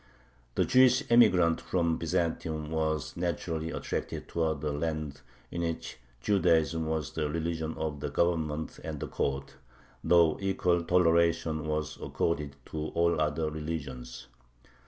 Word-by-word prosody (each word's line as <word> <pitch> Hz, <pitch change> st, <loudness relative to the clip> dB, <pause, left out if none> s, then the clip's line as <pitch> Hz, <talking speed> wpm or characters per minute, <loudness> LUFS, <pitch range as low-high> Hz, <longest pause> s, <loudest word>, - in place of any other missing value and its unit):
The -, -, +3 dB
Jewish 130 Hz, +1 st, +5 dB
emigrants 95 Hz, -9 st, +5 dB
from 85 Hz, -3 st, 0 dB
Byzantium 80 Hz, -2 st, -1 dB
were 80 Hz, -1 st, +1 dB, 0.2 s
naturally 85 Hz, -2 st, -2 dB
attracted -, -, -4 dB
towards 80 Hz, -3 st, -1 dB
a 75 Hz, -, 0 dB
land 75 Hz, -1 st, -3 dB, 0.3 s
in 85 Hz, -, -3 dB
which 80 Hz, -5 st, -4 dB, 0.2 s
Judaism 80 Hz, -3 st, +2 dB
was 80 Hz, -1 st, -2 dB
the 75 Hz, -2 st, -2 dB
religion 80 Hz, 0 st, -2 dB
of 75 Hz, -2 st, -3 dB
the 75 Hz, -, -3 dB
Government 80 Hz, -1 st, -1 dB
and 80 Hz, -2 st, -5 dB
the -, -, -4 dB
Court, 70 Hz, 0 st, -3 dB, 0.5 s
though 85 Hz, -3 st, +4 dB
equal 90 Hz, -2 st, +1 dB
toleration 85 Hz, -3 st, +2 dB
was 75 Hz, -1 st, -2 dB
accorded 75 Hz, -4 st, -1 dB, 0.2 s
to 80 Hz, 0 st, -3 dB
all 85 Hz, -1 st, +2 dB
other 75 Hz, +1 st, 0 dB
religions. 70 Hz, -6 st, -5 dB
80 Hz, 130 wpm, -30 LUFS, 75-85 Hz, 0.5 s, Jewish